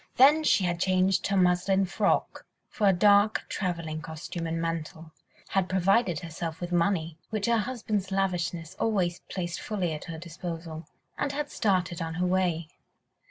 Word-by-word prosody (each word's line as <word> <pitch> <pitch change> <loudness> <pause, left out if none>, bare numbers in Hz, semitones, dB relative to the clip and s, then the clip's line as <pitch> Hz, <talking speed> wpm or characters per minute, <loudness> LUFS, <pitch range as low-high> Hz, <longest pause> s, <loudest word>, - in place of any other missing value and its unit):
Then 295 +5 +6
she 205 - +4
had 175 -1 0
changed 185 +1 +2
her 195 - +1
muslin 185 +2 +3
frock 185 - 0 0.2
for 210 - +1
a - - +7
dark 205 +3 +4
travelling 165 -4 -3
costume 160 +2 -6
and 165 0 -2
mantle, 165 0 -4 0.4
had 190 -2 +1
provided 190 -2 +2
herself 165 -1 -5
with 175 0 -5
money—which 175 +3 -1
her 235 -1 +3
husband's 215 -4 -2
lavishness 180 -3 -1
always 185 -6 +1
placed 175 -2 -4
fully 185 -6 -2
at 150 - -6
her 165 -2 -6
disposal—and 170 - -6
had 290 0 -3
started 185 -4 0
on 165 0 -3
her 180 +1 0
way. 180 -3 +1
180 Hz, 150 wpm, -28 LUFS, 165-195 Hz, 0.4 s, a